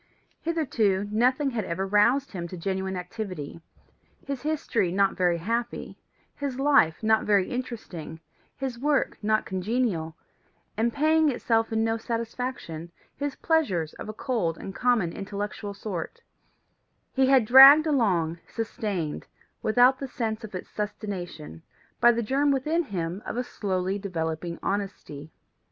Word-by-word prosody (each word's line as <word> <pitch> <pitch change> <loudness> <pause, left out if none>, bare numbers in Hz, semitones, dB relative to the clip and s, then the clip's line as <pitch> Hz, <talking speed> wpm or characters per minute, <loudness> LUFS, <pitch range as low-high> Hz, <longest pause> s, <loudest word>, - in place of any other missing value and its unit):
Hitherto 225 - 0
nothing 255 +6 +2
had 225 -3 -2
ever 185 +3 -2
roused 235 +8 +3
him 175 -3 -5
to 180 - -8
genuine 190 +1 -2
activity: 180 -5 -6 0.6
his 275 -2 -4
history 285 - 0
not 195 +1 +2
very 175 -2 +2
happy; 230 +7 -3 0.4
his 275 -3 -4
life 270 - +3
not 220 0 +3
very 200 -3 +2
interesting, 215 -11 -6 0.4
his 260 -3 -4
work 290 +1 +1
not 215 +1 +1
congenial, 185 -4 -1 0.6
and 235 +2 +1
paying 310 +3 +3
itself 225 -3 0
in 220 0 +1
no 225 0 +1
satisfaction, 230 -7 -4 0.2
his 285 -1 -3
pleasures 190 - 0
of - - -8
a - - -4
cold 215 - -1
and 195 - -7
common 235 -9 +1
intellectual 205 +1 -5
sort, 200 - -5 0.9
he 265 -1 +3
had 265 -4 +5
dragged 270 +6 +10
along, 185 - +1
sustained, 205 -8 -4 0.3
without 245 +4 +4
the 275 - -4
sense 225 -3 -3
of 210 -3 -8
its 180 - -7
sustentation, 180 - -5 0.4
by 240 - +7
the 235 0 -1
germ 275 +6 +1
within 300 +5 +1
him 185 - -4
of - - -5
a 250 - 0
slowly 190 -4 -2
developing 170 -3 -3
honesty. 185 -7 -4
215 Hz, 140 wpm, -26 LUFS, 185-255 Hz, 0.9 s, dragged